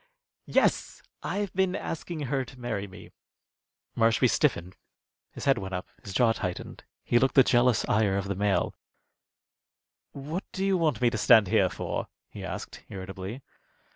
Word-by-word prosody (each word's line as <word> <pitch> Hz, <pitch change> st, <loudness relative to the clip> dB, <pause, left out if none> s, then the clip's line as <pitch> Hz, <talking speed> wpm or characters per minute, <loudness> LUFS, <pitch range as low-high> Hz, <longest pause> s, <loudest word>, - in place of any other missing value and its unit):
Yes, -, -, +1 dB, 0.2 s
I've 200 Hz, -1 st, -3 dB
been 190 Hz, 0 st, +1 dB
asking 165 Hz, -3 st, -5 dB
her 135 Hz, -1 st, -1 dB
to 130 Hz, +1 st, -13 dB
marry 110 Hz, -5 st, -3 dB
me." 95 Hz, 0 st, -13 dB, 0.8 s
Marshby 115 Hz, +2 st, +4 dB
stiffened. 95 Hz, -, 0 dB, 0.5 s
His -, -, -8 dB
head 135 Hz, -1 st, +3 dB
went 95 Hz, -1 st, -5 dB
up, 90 Hz, -, -5 dB
his 100 Hz, -, -8 dB
jaw 115 Hz, +3 st, +3 dB
tightened. 90 Hz, -5 st, -5 dB, 0.2 s
He 120 Hz, -, +3 dB
looked 135 Hz, +1 st, +1 dB
the 135 Hz, -, +8 dB
jealous 120 Hz, -1 st, +3 dB
ire 105 Hz, -2 st, +2 dB
of 100 Hz, 0 st, -2 dB
the 100 Hz, -, -1 dB
male. 100 Hz, 0 st, 0 dB, 1.4 s
"What 150 Hz, +7 st, -5 dB
do 190 Hz, 0 st, -1 dB
you 195 Hz, -1 st, +3 dB
want 155 Hz, -10 st, +1 dB
me 120 Hz, -1 st, +4 dB
to 110 Hz, -, -2 dB
stand 105 Hz, -2 st, +6 dB
here -, -, +3 dB
for?" -, -, -4 dB, 0.2 s
he -, -, -8 dB
asked, -, -, -7 dB
irritably. 95 Hz, +6 st, -7 dB
120 Hz, 160 wpm, -28 LUFS, 100-140 Hz, 1.4 s, the